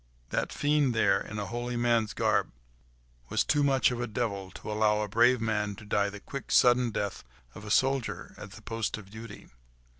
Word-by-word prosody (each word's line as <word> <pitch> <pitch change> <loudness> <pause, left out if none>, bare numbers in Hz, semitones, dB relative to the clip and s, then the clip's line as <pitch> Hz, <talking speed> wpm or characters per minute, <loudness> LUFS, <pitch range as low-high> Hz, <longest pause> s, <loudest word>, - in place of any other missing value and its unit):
That - - -1
fiend 145 -4 +1
there, 100 -3 +3
in 110 - -7
a 105 - -2
holy 120 +2 -4
man's 120 -3 +1
garb, - - +1 0.8
was - - +2
too 145 - +2
much 135 -2 +3
of 120 -1 -3
a 120 - -2
devil 100 -4 -3
to 105 - -8
allow 105 0 +2
a 105 - -2
brave 120 +4 +4
man 105 -2 -1
to 105 - -12
die 100 0 +1
the 105 0 -9
quick, 135 +6 -7
sudden 125 0 +5
death 100 -2 -3 0.3
of 105 - -10
a - - -7
soldier 135 +2 0
at - - -10
the - - -13
post 115 -2 -3
of 100 -2 -12
duty. 115 +2 -10
115 Hz, 200 wpm, -29 LUFS, 105-120 Hz, 0.8 s, sudden